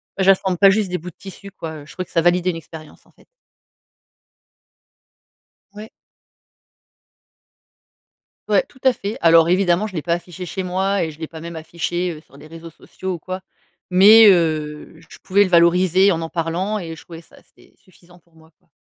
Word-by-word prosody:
bah, 190 - -1
j'assemble 190 -1 +2
pas 195 +1 +6
juste 200 -1 0
des 180 - -2
bouts 180 +2 -9
de - - -19
tissus 200 +1 -12
quoi, 160 -3 -8
heu - - -14
je 145 - -15
trouvais 185 - -6
que - - -23
ça 165 - +1
validait 180 +1 +2
une - - -8
expérience 160 -2 -12
en - - -26
fait. - - -26 2.5
Ouais. 215 +1 -10 2.6
Ouais - - +3
tout 260 - -23
à 260 - +5
fait, 205 -2 -6
alors 165 0 +5
évidemment, 185 +2 +1
je 195 - -12
l'ai 160 - -3
pas 170 - -1
affiché 175 +1 -6
chez 190 +2 -5
moi 190 +1 -1
et 160 - -4
je 150 - -17
l'ai 160 - -5
pas 160 -1 -11
même 170 0 -8
affiché, 175 +2 -4
heu, 155 - -12
sur 140 -3 -21
des 150 - -14
réseaux 165 +1 -11
sociaux 185 +3 -8
ou - - -10
quoi 185 +3 -7 0.5
mais, 210 +4 +7
heu, 155 -3 -1
je - - -13
pouvais 200 +2 +3
le - - -4
valoriser 180 +3 +4
en 165 -1 -3
parlant 175 +5 -3
et 165 -2 -7
je 155 - -15
trouvais 165 -1 -12
ça - - -22
assez - - -23
suffisant 175 -1 -23
pour 170 -1 -34
moi, 160 0 -22
quoi. - - -38
175 Hz, 200 wpm, -19 LUFS, 165-190 Hz, 2.6 s, mais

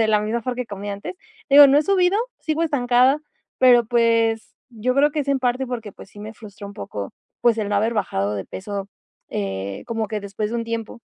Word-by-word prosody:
de 220 - +3
la 210 -1 +3
misma 225 +2 -1
for 250 +1 -2
que 250 - -2
comía 205 0 -6
antes. 200 - -7 0.4
Digo, 285 0 +10
no 275 - +4
he - - +3
subido, 380 +1 +2 0.2
sigo 315 +1 -2
estancada, 260 -2 +3 0.4
pero, 245 -2 +6
pues, 230 -1 +1 0.2
yo 245 +2 -1
creo 290 +2 +4
que 305 - -3
es 280 - -5
en 275 -1 +2
parte, 255 +1 0
porque, 225 -5 -5
pues - - -13
sí - - -15
me 215 +1 -7
frustra 205 -2 -11
un 200 - -9
poco, 100 - -6 0.3
pues, 230 -2 +3
el 210 - -1
no 205 - -1
haber 220 +3 +1
bajado 105 - -1
de 100 -2 -4
peso, 200 0 -6 0.4
eh, 95 -1 -4
como 225 -2 -2
que 215 - -2
después 200 +1 -4
de 235 - -2
un 230 - -2
tiempo. 230 0 -5
230 Hz, 225 wpm, -22 LUFS, 205-255 Hz, 0.4 s, Digo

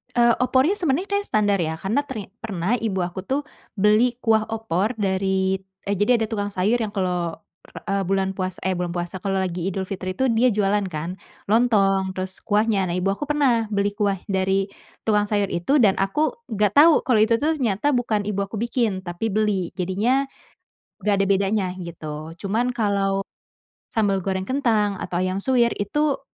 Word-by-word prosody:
Eee, 240 -1 +5 0.2
opornya 265 +10 +2
sebenarnya 345 +2 0
kayak 405 0 0
standar, 205 - +2
ya. 160 -2 -1
Karena 195 +11 -1
ternya 210 -7 -6
pernah 200 -4 -3
ibu 205 -5 -1
aku 180 +2 -3
tuh 275 +5 0 0.3
beli 215 +4 +3
kuah 220 -1 +3
opor 220 -1 -1
dari, 190 -2 0 0.3
eee, 200 - +2
jadi, 225 +3 +3
ada - - +2
tukang 205 -2 -3
sayur 200 +6 +2
yang 220 -3 -3
kalau, 180 -3 -1 0.6
eee, 195 -1 0
bulan 195 0 +1
puasa 185 -1 -3
eh 185 -1 -1
bulan 175 -1 -2
puasa, 175 +1 -4
kalau 195 0 -1
lagi 180 -2 -3
Idul 190 0 -3
Fitri 185 -1 -4
tuh, 260 +6 +1
dia 230 +1 +3
jualan 205 0 +1
kan, 175 +2 -5 0.3
lontong, 195 -5 +3
terus 185 0 -5
kuahnya. 210 -2 +2
Nah, 170 - -2
ibu 180 +2 0
aku 200 +9 -2
pernah 275 -6 +2
beli 200 0 +2
kuah 200 -3 0
dari 190 +1 +1 0.3
tukang 210 -1 +2
sayur 205 -2 0
itu, 250 +12 +2
dan 200 -4 +4
aku 195 +11 +1 0.2
nggak 210 -2 +1
tahu 315 +2 +8
kalau 245 -4 +2
itu 220 +2 +4
tuh 315 +1 +1
ternyata 230 +1 0
bukan 245 -6 +1
ibu 200 - -3
aku 210 +2 -6
bikin, 235 -5 0
tapi 185 +4 -3
beli. 210 -5 0
Jadinya, 225 +10 0 0.8
nggak 210 - +3
ada 195 0 +2
bedanya, 195 +1 +2
gitu. 160 -3 -7
Cuman 230 +5 0
kalau, 200 -3 0 0.7
sambal 200 -3 +1
goreng 190 0 -2
kentang 215 -6 +1
atau 175 - -4
ayam 185 +2 0
suwir 240 0 +2
itu, 290 +8 0
200 Hz, 180 wpm, -23 LUFS, 190-230 Hz, 0.8 s, tahu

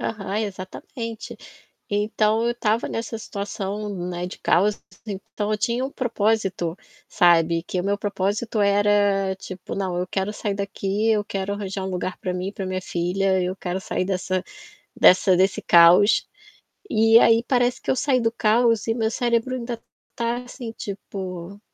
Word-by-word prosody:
Aham, 200 -2 -3
exatamente. 215 +3 -6 0.5
Então 215 +2 +1
eu 240 - 0
tava 225 -1 0
nessa 225 0 -4
situação, 205 -1 -4 0.2
né, 175 0 -3
de 180 - -10
caos. 205 +3 +2 0.2
Então 205 +1 -4
eu 210 - +1
tinha 235 +4 0
um 270 - -6
propósito, 210 -8 -1 0.3
sabe. 170 -3 +4
Que 180 0 -2
o - - -7
meu 200 +1 0
propósito 205 +2 -2
era, 200 -1 +3
tipo: 185 -1 -8
"Não, 185 -3 -2
eu 180 0 -2
quero 195 +3 -2
sair 210 -1 -2
daqui, 200 +2 -1
eu 215 -2 +2
quero 195 0 -3
arranjar 195 -1 -4
um 190 - -3
lugar 180 0 -3
para 180 -1 -3
mim 180 +1 -3
e - - -13
para 195 - -5
minha 185 0 -3
filha, 185 +2 0
eu 180 +1 -2
quero 185 0 -3
sair 185 - -2
dessa 185 0 -1 0.6
dessa 185 0 +6
desse 190 +1 +2
caos". 175 +5 +6 0.6
E 225 +1 +6
aí 230 0 +5
parece 245 -1 +1
que - - -2
eu - - +2
saí 260 -2 +2
do 225 -1 +1
caos 230 0 +2
e 225 - +1
meu 220 -2 0
cérebro 240 +2 0
ainda 235 -2 -4 0.4
tá 235 +1 -1
assim, 245 -2 -8
tipo, 195 -2 -7
205 Hz, 165 wpm, -23 LUFS, 185-225 Hz, 0.6 s, dessa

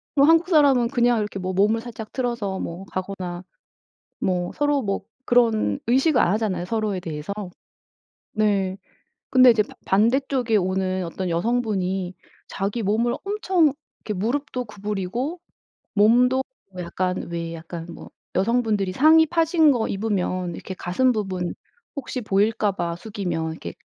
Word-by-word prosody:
그럼 280 0 +5
한국 330 +2 +4
사람은 275 -7 +4
그냥 240 -3 +2
이렇게 205 -2 -3
뭐 185 0 -3
몸을 210 +4 +3
살짝 225 -2 -8
틀어서 235 -7 -2
뭐 170 +3 -5
가거나 185 -2 -5 0.8
뭐 180 -1 -1
서로 290 -1 +1
뭐 195 -3 -2 0.2
그런 225 - +3
의식을 265 +2 +3
안 175 - +3
하잖아요 200 -5 -1
서로에 215 -2 -1
대해서. 155 +2 -5 1.0
네. 200 -3 +1 0.5
근데 255 -1 +7
이제 220 -2 +3
바 - - -14
반대쪽에 240 +3 +2
오는 185 0 0
어떤 180 +2 -4
여성분이 190 -2 -1 0.3
자기 200 +4 -3
몸을 225 +4 +1
엄청 375 -7 +2 0.3
이렇게 210 - -2
무릎도 250 +5 -2
구부리고 210 - -4 0.6
몸도 245 +5 +4
어 195 - -10
약간 180 +1 -2
왜 170 -1 -4
약간 165 0 -7
뭐 - - -11 0.2
여성분들이 210 -2 +1
상의 315 +7 +6
파진 325 -1 +3
거 235 -3 0
입으면 185 -4 -1
이렇게 190 - -7
가슴 250 +10 +1
부분 190 -5 -3 0.4
혹시 260 -2 -4
보일까 210 0 +1
봐 170 -2 -3
숙이면 180 -5 -3
이렇게 85 - -8
210 Hz, 300 characters per minute, -23 LUFS, 185-245 Hz, 1.0 s, 근데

